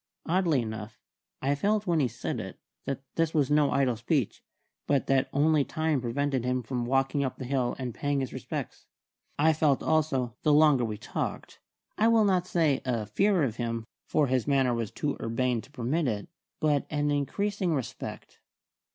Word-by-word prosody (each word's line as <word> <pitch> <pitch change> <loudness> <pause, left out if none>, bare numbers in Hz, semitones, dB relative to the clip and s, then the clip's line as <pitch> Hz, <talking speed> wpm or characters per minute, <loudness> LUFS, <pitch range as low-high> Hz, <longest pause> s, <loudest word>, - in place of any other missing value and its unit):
Oddly 165 -7 +2
enough, 110 -1 -6 0.5
I 140 +2 +2
felt 210 +8 +1
when 170 -3 +2
he 135 - +3
said 120 0 -4
it - - -7 0.3
that 135 0 -3
this 165 -1 +1
was 145 -3 +2
no 150 -1 +4
idle 130 -3 +2
speech, 120 +1 -1 0.5
but 140 -2 +2
that 135 0 +2
only 150 +1 +3
time 155 -2 -1
prevented 130 +1 -1
him 125 0 0
from 120 0 -3
walking 135 +2 +1
up 130 - -3
the 130 - -6
hill 125 -1 0
and 125 -3 -4
paying 145 +2 -1
his 130 - -4
respects. - - -6 0.5
I 160 +2 +4
felt 150 -3 +2
also, 135 -7 +1
the 150 - +3
longer 150 -4 +5
we 110 -2 -4
talked, 110 - -5 0.4
I 220 - +5
will 225 -2 +5
not 185 -2 +2
say 160 -7 +2
a 120 -4 -1
fear 190 - +2
of 120 -4 -1
him, 115 -2 -3 0.2
for 150 - +2
his 130 -1 0
manner 135 -3 +3
was 115 -3 -2
too 145 +6 -3
urbane 120 +1 0
to - - -17
permit 140 +4 -1
it, 105 -4 -3 0.3
but 150 -3 +1
an 145 -1 0
increasing 180 +5 0
respect. 120 -4 -6
140 Hz, 180 wpm, -28 LUFS, 125-155 Hz, 0.5 s, longer